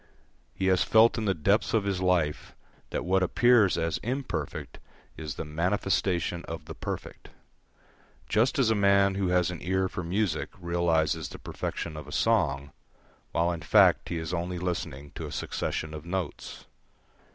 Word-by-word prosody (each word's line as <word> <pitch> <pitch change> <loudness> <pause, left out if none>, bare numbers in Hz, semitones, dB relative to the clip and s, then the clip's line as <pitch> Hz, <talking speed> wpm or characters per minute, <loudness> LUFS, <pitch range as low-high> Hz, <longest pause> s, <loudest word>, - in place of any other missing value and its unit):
He 95 - -2
has 95 -1 +4
felt 115 +1 +5
in 110 - -2
the 95 -2 +1
depths 100 +8 +2
of 110 - +2
his 100 -2 -1
life 90 -5 0 0.3
that - - -3
what 95 +1 +2
appears 110 +1 +4
as 85 -1 -1
imperfect 130 +3 -4 0.4
is 75 -2 -6
the - - -5
manifestation 90 +1 0
of 80 -3 -6
the - - -7
perfect; - - -7 1.0
just 115 +5 +2
as 125 -5 +3
a - - +5
man 100 -1 +4
who 95 -1 -1
has 90 0 +2
an 90 - -7
ear 95 +2 0
for 90 - -5
music 90 -1 -1
realises 85 -2 0
the - - -9
perfection 85 -2 -5
of 75 -2 -8
a - - -9
song, 70 -12 +1 0.6
while 85 +1 +1
in 85 -1 -4
fact 75 - +4
he 85 - -2
is 80 +1 -4
only 90 +1 -2
listening 85 -6 -4
to - - -6
a - - -8
succession 80 0 -3
of 75 -1 -7
notes. 90 -2 -5
90 Hz, 165 wpm, -28 LUFS, 80-100 Hz, 1.0 s, felt